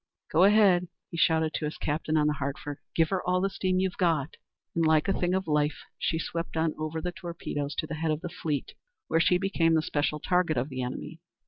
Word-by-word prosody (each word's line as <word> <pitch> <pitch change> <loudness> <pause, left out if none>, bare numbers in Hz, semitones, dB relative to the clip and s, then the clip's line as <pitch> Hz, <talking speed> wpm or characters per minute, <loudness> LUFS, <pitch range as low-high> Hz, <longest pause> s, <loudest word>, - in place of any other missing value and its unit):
"Go 175 +4 +6
ahead!" 195 -4 +5 0.2
he 170 - -5
shouted 160 -1 +3
to 155 - -2
his 150 - -4
captain 155 +1 -1
on 150 - +3
the 150 - +2
Hartford; 140 0 -4 0.2
"give 165 -1 +3
her 190 -2 0
all 180 0 +1
the 195 +1 0
steam 185 -1 0
you've 185 -1 0
got!" 165 -4 +1 0.4
And 165 - +1
like 155 +1 +3
a 195 - +3
thing 180 -1 0
of 190 0 -1
life 150 0 +1 0.2
she 160 - 0
swept 165 0 -4
on 160 -1 +1
over 155 +1 -3
the 180 - -2
torpedoes 160 -5 -5
to - - -1
the 160 - -6
head 160 +1 -1
of 155 0 0
the 175 - -4
fleet, 155 -4 -3 0.4
where 165 - +3
she 180 +2 +4
became 175 -4 +2
the 160 - +2
special 150 0 -1
target 180 -2 +1
of 125 +4 0
the 130 -2 -4
enemy. 150 +6 -5
160 Hz, 230 wpm, -28 LUFS, 150-180 Hz, 0.4 s, Go